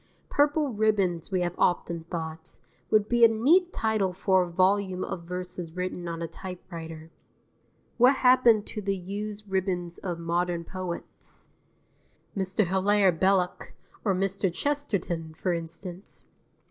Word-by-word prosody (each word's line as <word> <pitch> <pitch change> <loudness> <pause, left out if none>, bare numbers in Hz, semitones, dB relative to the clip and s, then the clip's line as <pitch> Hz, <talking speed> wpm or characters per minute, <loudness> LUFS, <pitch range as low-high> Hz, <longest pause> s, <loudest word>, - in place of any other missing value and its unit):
"Purple 290 -2 +2
Ribbons" 200 -6 +1
we 185 -2 0
have 175 -1 -1
often 170 -2 +1
thought, 160 -2 -6 0.3
would 215 -1 +3
be 240 0 +3
a - - +11
neat 305 +12 +3
title 215 -4 0
for 190 0 +3
a 180 - -2
volume 185 +1 +2
of 170 -2 -5
verses 180 -1 -5
written 180 -1 -3
on 170 0 -4
a - - -2
typewriter. 165 -3 -8 0.9
What 255 +3 +7
happens 250 -5 +5
to 215 - -4
the 195 -1 -1
used 205 +3 -6
ribbons 185 -3 -2
of 175 -3 -4
modern 170 0 -1
poets? 185 -1 -8 0.9
Mr. 190 +1 +1
Hilaire 190 +2 +3
Belloc, 185 +1 +1 0.3
or 195 -4 +2
Mr. 195 0 0
Chesterton, 180 - -2
for 180 +2 -1
instance. 170 +3 -7
185 Hz, 135 wpm, -27 LUFS, 175-210 Hz, 0.9 s, a